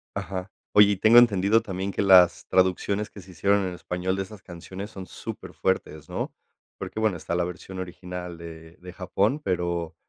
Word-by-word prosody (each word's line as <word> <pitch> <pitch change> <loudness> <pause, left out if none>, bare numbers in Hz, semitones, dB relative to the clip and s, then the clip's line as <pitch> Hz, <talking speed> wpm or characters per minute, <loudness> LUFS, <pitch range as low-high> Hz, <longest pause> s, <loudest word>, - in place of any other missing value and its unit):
Ajá. 95 0 -4 0.2
Oye, 105 0 +7
y - - -2
tengo 110 +4 +6
entendido 110 -1 +4
también 95 -2 -4
que - - -2
las 90 -3 +6
traducciones 95 +3 +1
que 100 - -12
se 95 +1 -14
hicieron 100 +4 +2
en 90 - -3
español 90 +1 -3
de 95 - -2
esas 100 +1 -12
canciones 95 +3 -8
son 95 -3 -8
superfuertes, 75 -3 -4
¿no? - - -4 0.4
Porque, - - -6
bueno, 110 -5 +1
está 80 +1 -5
la 90 - +1
versión 90 +2 -7
original 90 -1 -7
de 80 0 -11
de 90 0 -11
Japón, 100 +8 0
pero 85 -2 -2
95 Hz, 180 wpm, -25 LUFS, 90-100 Hz, 0.4 s, Oye